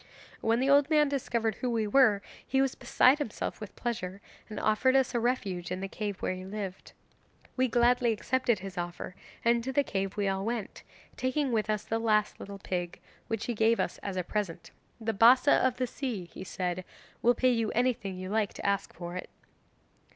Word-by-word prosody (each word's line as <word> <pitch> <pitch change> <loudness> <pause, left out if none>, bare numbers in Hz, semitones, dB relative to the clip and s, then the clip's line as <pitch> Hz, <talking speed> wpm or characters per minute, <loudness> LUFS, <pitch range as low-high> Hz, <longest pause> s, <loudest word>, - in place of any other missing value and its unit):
'When 225 +1 +2
the 265 - +1
old 285 +1 +5
man 300 -2 +4
discovered 235 -5 0
who 250 - 0
we 225 -2 0
were 210 -3 +4 0.2
he 265 - 0
was 270 -1 +2
beside 255 +3 +4
himself 230 -6 -4
with 210 -2 -8
pleasure, 200 -6 -3 0.3
and 215 - -5
offered 215 +5 +3
us 265 -1 +3
a 240 - +1
refuge 200 -8 -1
in 185 - -2
the 195 - -3
cave 205 0 -5
where - - 0
he 185 0 -7
lived. 195 -1 -6 0.6
We 260 0 +2
gladly 240 0 +3
accepted 240 +1 +1
his 190 -1 -7
offer, 175 +1 -5 0.3
and 235 0 +3
to 265 - -2
the 285 +1 +3
cave 195 -5 -3
we 205 -1 +1
all 195 0 0
went, 225 -1 -4 0.4
taking 260 +1 0
with 215 -2 0
us 215 -1 0
the 225 - -1
last 215 -2 +1
little 200 0 -7
pig, 175 -2 -4 0.3
which 225 -2 -2
he 240 - -1
gave 225 +1 +3
us - - -1
as 195 -2 -5
a 180 - 0
present. 200 -2 -3 0.3
'"The 225 0 -1
Bassa 245 +7 +6
of 260 -1 +2
the 255 - +1
Sea," 240 -7 -4
he 185 +2 -10
added, 180 0 -1 0.4
"will 240 +1 +4
pay 255 0 +3
you 230 -3 +1
anything 225 -6 0
you 185 0 -6
like 215 -2 +1
to - - -8
ask 200 -1 0
for 175 0 -6
it." 180 - -6
220 Hz, 200 wpm, -30 LUFS, 195-250 Hz, 0.6 s, Bassa